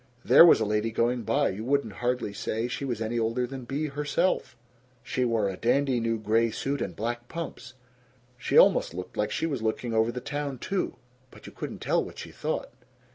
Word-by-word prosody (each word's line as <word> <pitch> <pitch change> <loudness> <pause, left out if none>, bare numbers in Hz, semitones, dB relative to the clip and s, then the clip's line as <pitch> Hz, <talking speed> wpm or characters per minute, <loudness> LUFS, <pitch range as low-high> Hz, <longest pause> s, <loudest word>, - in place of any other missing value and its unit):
There 140 +7 +9
was - - +7
a 110 - +1
lady 105 +2 0
going 120 +2 0
by, 140 +5 +1
you 100 +3 -5
wouldn't 140 +3 0
hardly 125 -4 -1
say 110 +3 -2
she 130 +3 -4
was 120 -4 -2
any 115 +2 -1
older 115 +2 0
than 130 0 -7
Bea 140 +5 -2
herself; 150 -1 -1 0.5
she 130 - -1
wore 115 -4 +1
a 95 - -3
dandy 130 +4 +1
new 115 0 0
gray 110 +2 +2
suit 140 +5 -3
and - - -3
black 120 +2 -3
pumps. 165 -5 -7 0.6
She 120 - 0
almost - - +5
looked 90 0 -7
like 105 - 0
she - - -1
was 140 -7 -2
looking 115 +1 -2
over 110 +1 +2
the 125 - -5
town, 145 +1 -4
too. 190 +9 -2 0.3
But - - -16
you - - -9
couldn't - - -7
tell - - +2
what - - -10
she - - -8
thought. - - -3
120 Hz, 205 wpm, -27 LUFS, 110-135 Hz, 0.6 s, There